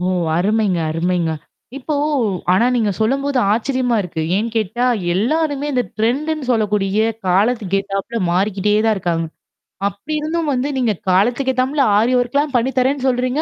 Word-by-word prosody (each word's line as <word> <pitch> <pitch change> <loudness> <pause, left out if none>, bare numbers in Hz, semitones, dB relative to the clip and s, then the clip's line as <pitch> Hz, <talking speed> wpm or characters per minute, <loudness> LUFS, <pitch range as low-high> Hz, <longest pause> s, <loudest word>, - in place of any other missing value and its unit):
ஓ! 180 - -2 0.3
அருமைங்க 200 0 +1
அருமைங்க. 170 +1 0 0.5
இப்போ 290 +3 -3 0.6
ஆனா 225 +6 +3
நீங்க 220 -4 +1
சொல்லும்போது 275 +4 +1
ஆச்சரியமா 245 +1 0
இருக்கு. 165 -3 -4
ஏன்னு 220 +3 0
கேட்டா 225 +3 0 0.3
எல்லாருமே 290 - 0
இந்த 250 -2 +1 0.2
டரெண்ட் 250 +8 0
-ன்னு 300 -5 -5
சொல்லக்கூடிய 210 -3 +1 0.3
காலத்துக்கு 200 +2 +1
கேட்டாப்பல 195 +3 -3
மாறிக்கிட்டே 200 +3 +1
தான் 220 - +3
இருக்காங்க. 170 -3 -1 0.6
அப்படி 200 +10 -6
இருந்தும் 315 +1 -2
வந்து 255 +2 -1
நீங்க 240 -4 +1 0.2
காலத்துக்கேத்தாப்ல 255 +8 +1 0.2
ஆரி 230 +4 +2
ஒர்க்லாம் 280 +4 0
பண்ணி 245 +2 +2
தர்ரேன்னு 265 +1 +1
சொல்றீங்க? 255 +3 0
235 Hz, 140 wpm, -18 LUFS, 195-265 Hz, 0.6 s, ஆனா